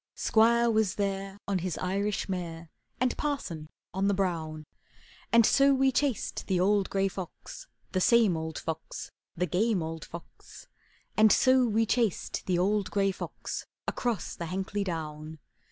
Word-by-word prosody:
Squire 235 +2 +4
was 220 -3 +1
there 195 -1 -2
on 195 -2 +1
his 175 -1 -3
Irish 200 +3 -1
mare, 170 -4 -5 0.3
And 250 0 +1
Parson 175 - -3 0.2
on 190 +2 +1
the 200 - +2
brown; 160 -5 -2 0.7
And 230 -1 +6
so 275 +2 +5
we 265 0 +3
chased 265 -3 -1
the 185 -2 +1
old 200 +1 +2
gray 195 0 +1
fox, 195 - -8 0.2
The 185 - 0
same 225 -4 +5
old 160 0 -4
fox, 160 0 -5 0.3
The 180 - +1
game 190 +2 +1
old 160 0 -5
fox, 170 0 -12 0.5
And 215 -1 +6
so 255 -1 +5
we 225 +1 +2
chased 225 -3 -1
the 180 -2 +2
old 200 +2 +1
gray 195 -1 +2
fox 190 - -6 0.2
Across 235 -7 -2
the 170 - -4
Hankley 190 +3 -2
Down. 155 -3 -5
195 Hz, 155 wpm, -29 LUFS, 170-220 Hz, 0.7 s, And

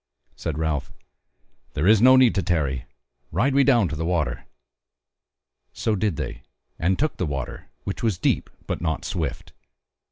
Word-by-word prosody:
Said 80 -2 -4
Ralph: 80 -4 -1 0.8
"There 75 - 0
is 105 +1 +6
no 130 +2 +8
need 130 -3 +6
to 100 - +1
tarry, 70 -10 0 0.5
ride 120 - +2
we 140 0 +5
down 120 -8 +4
to - - -4
the 80 - -3
water." 80 -8 -1 1.3
So 110 - 0
did 100 -3 0
they, - - -5 0.4
and 90 +3 +2
took 155 +2 0
the 90 - -1
water, 70 -4 -5
which 100 - -4
was 110 -6 +1
deep, - - 0 0.2
but - - -3
not 80 -2 -2
swift. 85 -6 -4
90 Hz, 160 wpm, -24 LUFS, 75-110 Hz, 1.3 s, no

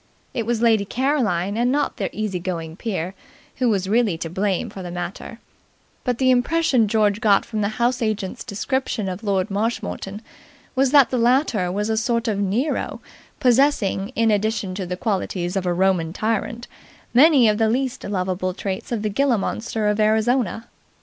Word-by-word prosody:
It 230 -3 -2
was 235 -1 0
Lady 225 -3 +4
Caroline, 215 - 0
and 245 +2 +2
not 290 +1 0
the - - -2
easy 210 -4 -3
going 165 -3 -4
peer, 185 -4 -3 0.4
who 250 -2 +2
was 195 -3 0
really 215 -4 +2
to 165 -1 -5
blame 190 0 -1
in 195 - -6
the 175 - -6
matter; 180 +6 -6 0.7
but 250 -2 -1
the 260 0 +3
impression 255 +1 +2
that 220 - +3
George 210 0 +1
got 205 -4 +4
from 215 -2 -3
the 205 - +1
house 245 +1 +1
agent's 215 -4 -2
description 220 0 -2
of 185 +3 -5
Lord 195 -1 0
Marshmoreton 210 -1 -3 0.5
was 270 0 +2
that 280 -1 +5
the 250 - 0
latter 235 -6 +2
was 205 +3 -1
a 220 0 0
sort 230 +1 0
of 210 -3 0
Nero, 210 +10 -1 0.4
possessing, 245 -6 +2
in 225 -1 +3
addition 210 -2 0
to 185 -1 -4
the 180 0 -4
qualities 185 -4 -2
of 190 -2 -1
a - - +2
Roman 175 -2 +1
tyrant, 225 +3 -2 0.5
many 270 -1 +6
of 210 0 +2
the 220 -1 +3
least 255 +2 -1
lovable 185 -2 -2
traits 190 +2 -4
of 225 -3 -2
the 215 - 0
ghila 260 0 +2
monster 220 +1 -2
of 210 +1 +1
Arizona. 220 +1 +1
215 Hz, 180 wpm, -22 LUFS, 190-240 Hz, 0.7 s, many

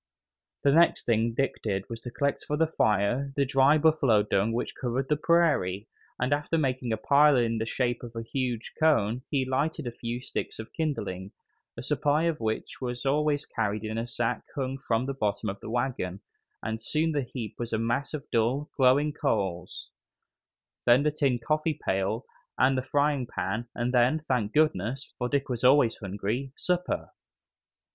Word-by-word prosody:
The 140 - +5
next 170 +4 +4
thing 115 0 +1
Dick 135 +2 -1
did 100 -3 -2
was 115 -1 -7
to 120 - -6
collect 140 +3 -1
for 150 - -1
the 160 - +4
fire 120 -1 +1
the 140 - +2
dry 135 +3 +4
buffalo 145 -9 +4
dung 105 +1 +1
which 120 +2 -2
covered 130 +1 -2
the 150 - +4
prairie, 145 - +2 0.3
and 125 +3 +1
after 150 +3 0
making 130 -5 -1
a 110 - 0
pile 145 +5 +5
in 115 -2 +1
the 110 - -2
shape 120 0 -1
of 120 -1 -9
a 115 - -4
huge 125 -1 -3
cone 125 -7 +3
he 135 -3 +1
lighted 145 +3 -1
a 120 - -3
few 120 0 -4
sticks 125 - -5
of 110 - -9
kindling, 100 - -3 0.4
a 120 - -6
supply 150 +2 +1
of 165 -2 0
which 110 +3 -3
was 125 0 -4
always 145 +1 +1
carried 105 -1 -2
in 110 +1 -3
a 115 - -3
sack 120 0 -1
hung 135 -1 -2
from 120 -2 0
the 135 - -2
bottom 105 -3 -1
of 100 +1 -5
the - - -8
wagon, 120 -6 -2 0.4
and 110 0 -3
soon 160 +7 +1
the 145 -2 0
heap 120 -3 -6
was 120 -1 -4
a 110 - +1
mass 120 +7 -1
of 145 -1 -7
dull, 120 +6 +1
glowing 140 +3 +4
coals; 100 - -2 1.0
then 120 +3 +6
the 150 - +2
tin 140 -4 +1
coffee 155 +5 -1
pail 95 +5 0 0.3
and 130 +1 +4
the 130 - +1
frying 145 -1 +1
pan, 115 +1 -3
and 120 +1 -1
then, 125 +4 +4
thank 115 -5 0
goodness! 135 -3 0
for 125 0 -1
Dick 140 +1 0
was 125 -2 -3
always 125 -3 +5
hungry 105 +7 -3
supper. 180 0 -1
125 Hz, 185 wpm, -28 LUFS, 115-145 Hz, 1.0 s, then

